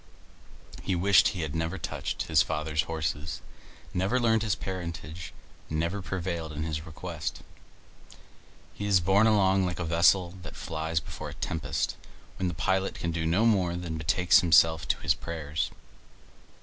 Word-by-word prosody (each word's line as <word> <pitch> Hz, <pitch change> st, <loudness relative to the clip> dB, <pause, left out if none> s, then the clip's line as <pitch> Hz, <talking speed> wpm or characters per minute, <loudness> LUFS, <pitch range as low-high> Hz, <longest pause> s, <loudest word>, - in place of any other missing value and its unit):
He 95 Hz, -, -1 dB
wished 95 Hz, +3 st, +5 dB
he 95 Hz, -6 st, -2 dB
had 75 Hz, -3 st, -3 dB
never 80 Hz, +3 st, -2 dB
touched 80 Hz, -, -3 dB
his -, -, +4 dB
father's 75 Hz, 0 st, 0 dB
horses, 80 Hz, 0 st, -3 dB, 0.5 s
never 95 Hz, +8 st, +1 dB
learned 115 Hz, -2 st, +3 dB
his 110 Hz, -2 st, +1 dB
parentage, 85 Hz, -3 st, -6 dB, 0.4 s
never 85 Hz, +5 st, -1 dB
prevailed 85 Hz, -4 st, -3 dB
in 75 Hz, +1 st, -3 dB
his 80 Hz, 0 st, -4 dB
request. 80 Hz, 0 st, -5 dB, 1.3 s
He 100 Hz, -, -4 dB
is 100 Hz, -2 st, +5 dB
borne 95 Hz, +5 st, +4 dB
along 95 Hz, -3 st, +4 dB
like 90 Hz, -, -3 dB
a 85 Hz, -, -2 dB
vessel 85 Hz, +2 st, +4 dB
that 75 Hz, -5 st, -9 dB
flies 80 Hz, 0 st, -2 dB
before -, -, -7 dB
a -, -, -8 dB
tempest, 80 Hz, -, -2 dB, 0.4 s
when 95 Hz, -, 0 dB
the 85 Hz, -, -3 dB
pilot 95 Hz, +4 st, 0 dB
can 85 Hz, -, -2 dB
do 80 Hz, -1 st, -1 dB
no 90 Hz, +8 st, +3 dB
more 100 Hz, -6 st, +3 dB
and 85 Hz, -2 st, -4 dB
betakes 90 Hz, +3 st, +4 dB
himself 80 Hz, -1 st, +4 dB
to -, -, +1 dB
his -, -, +3 dB
prayers. 80 Hz, -2 st, -3 dB
85 Hz, 155 wpm, -28 LUFS, 80-95 Hz, 1.3 s, wished